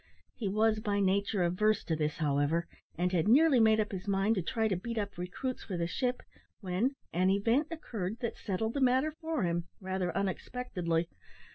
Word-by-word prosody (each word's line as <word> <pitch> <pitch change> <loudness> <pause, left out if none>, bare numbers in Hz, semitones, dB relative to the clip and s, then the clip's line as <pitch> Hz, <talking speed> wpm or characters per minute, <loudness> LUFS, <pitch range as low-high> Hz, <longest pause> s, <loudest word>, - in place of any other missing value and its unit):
He 220 - -4
was 215 +2 +2
by 205 -2 0
nature 200 0 +1
averse 205 +5 +2
to 160 - -1
this, 150 -1 -1
however; 150 +3 +1 0.3
and 180 +1 +1
had 180 0 +1
nearly 275 +3 +6
made 220 -1 +5
up 215 - 0
his 190 +1 -6
mind 200 +2 +2
to 195 - 0
try 220 +6 0
to 195 - 0
beat 230 +6 -5
up 205 -1 -2
recruits 180 +9 -4
for 185 - -4
the 170 - 0
ship, 250 +8 -1 0.4
when 205 +8 0 0.2
an 185 +2 +3
event 230 +9 +2
occurred 225 - -4
that 235 - -2
settled 220 +4 -2
the 280 - -2
matter 260 +4 +3
for 320 -6 -1
him 170 -1 0
rather 185 -2 -2
unexpectedly. 185 -4 -1
200 Hz, 185 wpm, -31 LUFS, 180-230 Hz, 0.4 s, nearly